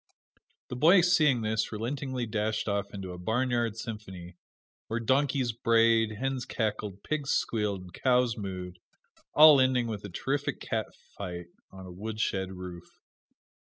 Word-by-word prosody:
The - - -4
boy 170 +8 +6
seeing 155 -8 +3
this, 110 0 -1
relentingly 125 +3 -3
dashed 110 0 -2
off 100 -1 -1
into 95 -2 -6
a 90 - -8
"barnyard 120 +2 0
symphony," 95 -6 -8 0.5
where 110 - -2
donkeys 130 +1 +1
brayed, 115 -1 +3
hens 130 +3 -2
cackled, 105 -3 -3
pigs 145 -2 -3
squealed 105 -8 0
and 90 -1 -13
cows 125 -1 +2
mooed, 90 -3 -6 0.6
all 150 -2 +9
ending 130 -2 +2
with 110 -3 -5
a 100 - -6
terrific 135 +10 -2
cat - - -2 0.3
fight 90 -3 -6 0.2
on 95 -1 -11
a 90 - -9
wood 105 +4 -6
shed 95 -3 -1
roof. 90 -2 -10
110 Hz, 145 wpm, -29 LUFS, 100-125 Hz, 0.6 s, all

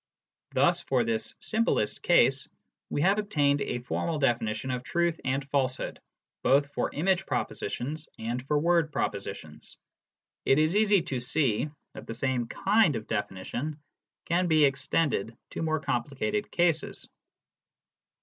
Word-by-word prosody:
Thus - - +3
for - - +1
this 115 -1 0
simplest 220 - 0
case - - +3 0.4
we 145 - -1
have 195 +5 +3
obtained 145 -9 +1
a - - -2
formal 155 +6 -2
definition 120 -2 0
of 125 -1 -2
truth 170 +4 0
and 135 +1 -1
falsehood, 130 -2 -1 0.4
both 140 +2 +3
for - - -1
image 190 +4 +1
propositions 135 +9 -3
and 120 +3 -3
for 150 - +2
word 165 0 +2
proposi - - -2
tions. - - -13 0.7
It 135 - +4
is 155 +4 +2
easy 205 -4 +4
to 135 -7 -3
see 125 0 +1 0.2
that - - -10
the 115 - -5
same 125 -1 -1
kind 200 - +3
of 110 -1 -4
definition 110 +8 -3 0.5
can 175 +2 +1
be 155 -3 +5
extended 140 -4 0
to - - -4
more 160 -1 0
complicated 120 -6 -2
cases. 170 -3 0
145 Hz, 140 wpm, -28 LUFS, 120-165 Hz, 0.7 s, be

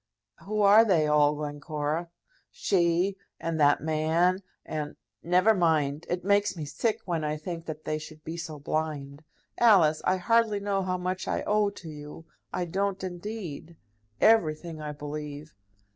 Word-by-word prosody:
"Who 210 +1 -1
are 205 +3 +8
they 180 -8 +3
all, 150 0 +4
Glencora?" 150 +2 -3 0.4
"She 180 +1 +1 0.2
and 165 -1 -2
that 145 -1 +4
man, 160 +4 +1 0.2
and. 150 -1 -4 0.3
Never 180 +6 +4
mind. 160 -5 +1
It 175 +1 -2
makes 205 -1 +2
me 155 - -4
sick 180 +10 -1
when 170 -4 -1
I 150 0 -1
think 165 +1 -6
that 155 -1 -6
they 155 0 -1
should 155 0 -11
be 160 - -5
so 165 -2 -6
blind. 145 -1 -3 0.4
Alice, 185 -10 +5
I 185 - +2
hardly 220 +2 +2
know 200 -1 0
how 185 -1 -1
much 185 +1 -3
I - - -1
owe 210 -1 +2
to 195 -4 -11
you; 150 +1 -10 0.3
I 180 - -2
don't, 195 +2 -2
indeed. 175 -3 -6 0.4
Everything, 165 -6 +2
I 150 -1 -4
believe." 150 +1 -7
165 Hz, 155 wpm, -28 LUFS, 150-190 Hz, 0.4 s, are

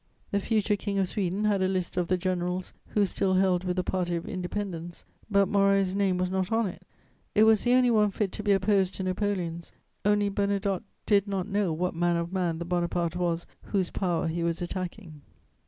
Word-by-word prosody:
The 200 - +2
future 210 0 +1
King 200 0 -3
of 190 -1 +2
Sweden 200 0 -1
had 205 -2 +2
a 185 - +3
list 185 -2 -2
of 180 -1 0
the 185 - +2
generals 180 0 -2
who 205 -1 +2
still 190 0 0
held 185 -1 +3
with 180 -1 -1
the 185 - 0
party 175 -1 -1
of 165 - -4
independence, 180 -2 -5 0.2
but 200 -2 +4
Moreau's 195 -1 +3
name 195 -2 +1
was 180 0 -1
not 190 +1 -1
on 225 0 +2
it; 185 - -6 0.5
it 215 - +6
was 220 -1 +5
the 245 - +3
only 250 -1 +5
one 210 -2 +4
fit 200 -1 -2
to - - -5
be 205 -1 +1
opposed 195 -1 +2
to 190 - -4
Napoleon's, 185 -3 -2 0.3
only 205 0 +3
Bernadotte 200 0 0 0.2
did 205 -1 +3
not 195 -1 -2
know 200 -3 0
what 180 +3 -1
manner 175 0 +1
of 170 +2 -6
man 175 -3 0
the 170 - -5
Bonaparte 175 -1 -1
was 170 -1 -1 0.2
whose 190 -4 -1
power 175 -4 0
he 165 +1 -2
was 170 0 0
attacking. 175 -3 -6
185 Hz, 205 wpm, -28 LUFS, 175-200 Hz, 0.5 s, it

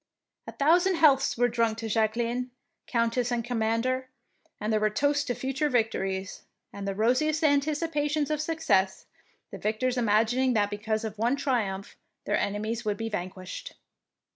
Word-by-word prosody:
A - - -7
thou 315 +5 +5
sand 375 0 +1
healths 275 -6 +4
were 245 +1 +4
drunk 230 -2 0
to 225 0 -4
Jacqueline, 230 +3 0 0.4
Countess 235 +1 0
and 235 -1 -1
Commander, 245 +2 0 0.5
and 215 +1 -1
there 215 - +3
were 215 0 +2
toasts 285 +6 +1
to 245 - -2
future 270 +5 -1
victories, 195 -6 -1 0.3
and 200 0 -6
the 195 - -2
rosiest 260 - +1
anticipations 295 0 +1
of 305 -1 0
success, 310 -12 +1 0.5
the - - -7
victors 245 +4 -1
imagining 240 +3 +2
that 205 -2 +1
because 215 +1 -2
of 215 -1 -5
one 240 +4 +2
triumph 220 -9 -2 0.3
their - - +1
enemies 215 +3 -2
would 210 -2 -1
be 225 0 -3
vanquished. 185 - -6
235 Hz, 155 wpm, -27 LUFS, 215-280 Hz, 0.5 s, thou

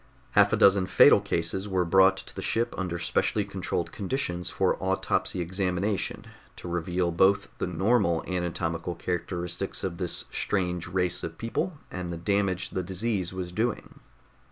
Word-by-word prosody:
Half - - +5
a - - +2
dozen 100 -1 +5
fatal - - +7
cases 85 +4 -1
were 95 -3 +1
brought 95 +2 +5
to - - -9
the - - -4
ship 115 +1 0
under 90 -2 -3
specially 100 +4 0
controlled 95 -3 -3
conditions 90 -5 -2
for - - +1
autopsy 90 - 0
examination, 95 +2 -1 0.3
to - - -9
reveal 85 +1 -1
both 95 +4 +3
the - - -1
normal 95 -3 +2
anatomical 85 -1 -2
characteristics 90 0 -3
of 85 -2 -3
this 90 -2 -2
strange 90 -4 -1
race 90 0 -1
of 80 0 -5
people 155 +9 -2
and 90 -1 -4
the 85 - -4
damage 95 +1 0
the 95 - -1
disease 95 +1 -2
was 90 -1 -5
doing. 110 +5 -2
90 Hz, 155 wpm, -27 LUFS, 85-100 Hz, 0.3 s, fatal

